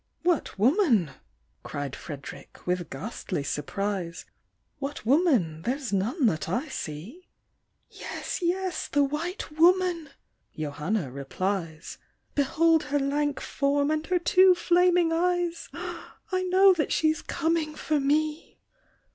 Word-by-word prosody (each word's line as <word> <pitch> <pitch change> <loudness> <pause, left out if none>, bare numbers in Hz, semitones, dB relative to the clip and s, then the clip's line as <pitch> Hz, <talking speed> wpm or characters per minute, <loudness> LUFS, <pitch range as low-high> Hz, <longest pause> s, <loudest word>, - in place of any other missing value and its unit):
" - - -48
What 345 - 0
woman! 235 - +3 0.5
(cried 145 -2 -5
Fred'rick, 145 -4 -10
with 180 -1 -1
ghastly 165 - -4
surprise) 170 +4 -3 0.5
What 280 -3 -5
woman? 245 - +2
there's 255 - -3
none 235 - +1
that 160 -7 +1
I 250 - -1
see 210 - -7 0.2
!" - - -48
" - - -48
Yes, - - -5
yes; 365 +1 -1
the 285 0 +2
white 315 +6 -3
woman! 340 0 +3 0.5
(Johanna 155 - -2
replies) 165 +4 -4 0.3
Behold 315 +3 +3
her 290 0 0
lank 285 +1 0
form, 285 +1 0
and 310 0 0
her 365 - +2
two 370 +1 +5
flaming 350 -1 +3
eyes! 350 0 0 0.6
1 370 0 0
know 380 +1 +7
that 320 -4 -1
she's 315 0 +2
coming 325 -2 -1
for 305 -1 0
me! 300 +3 0
290 Hz, 125 wpm, -27 LUFS, -, 0.6 s, know